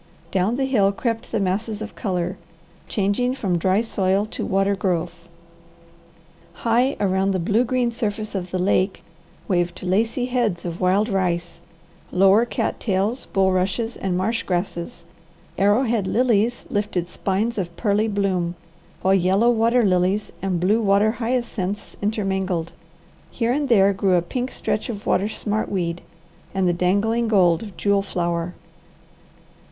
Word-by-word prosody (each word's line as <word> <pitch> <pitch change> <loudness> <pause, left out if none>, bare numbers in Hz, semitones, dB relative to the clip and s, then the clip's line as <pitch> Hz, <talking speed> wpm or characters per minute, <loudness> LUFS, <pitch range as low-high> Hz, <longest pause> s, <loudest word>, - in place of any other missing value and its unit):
Down 195 +5 +1
the 270 +1 0
hill 210 -7 +3
crept 230 +2 -3
the - - 0
masses 205 +3 -1
of 215 0 -6
colour, 180 -4 -2 0.5
changing 215 +6 0
from 185 -9 -1
dry 190 +4 +2
soil 195 -3 +1
to - - -4
water 195 0 +1
growth. 175 -2 -2 1.2
High 240 +7 +1
around 190 -1 +1
the 190 -1 0
blue 205 +7 +2
green 250 -1 0
surface 215 -2 -3
of 185 -2 -3
the 185 - -2
lake 185 +1 +1 0.4
waved 175 -2 -1
lacy 225 +7 +1
heads 235 -9 -1
of 170 -1 -5
wild 190 +4 +3
rice, 175 -4 -1 0.5
lower 195 +5 +5
cat - - -2
tails, 205 +4 -1
bulrushes, 190 +4 0
and 185 -2 -2
marsh 225 +5 0
grasses; 175 -2 -3 0.5
arrowhead 210 +1 +2
lilies 235 +1 +1
lifted 205 -4 -1
spines 205 +5 -1
of 175 -2 -5
pearly 210 0 +1
bloom, 190 -4 -1 0.5
while 190 - +4
yellow 195 +5 +3
water 235 +1 +3
lilies 185 +2 +1
and 190 -3 -1
blue 205 +6 +2
water 205 +1 +3
hyacinths 225 -4 -3
intermingled; 190 -5 -1 0.6
here 230 0 -1
and 285 0 -1
there 200 -4 +5
grew 195 -1 +2
a 175 - +2
pink 250 +7 -3
stretch 215 - -3
of 210 -3 -6
water 200 - +2
smartweed 195 -6 -2 0.6
and 190 -1 +2
the 175 - +3
dangling 205 +7 +1
gold 180 -6 +4
of 205 -4 -9
jewel 200 -1 +2
flower. 175 -2 -2
200 Hz, 140 wpm, -22 LUFS, 185-225 Hz, 1.2 s, lower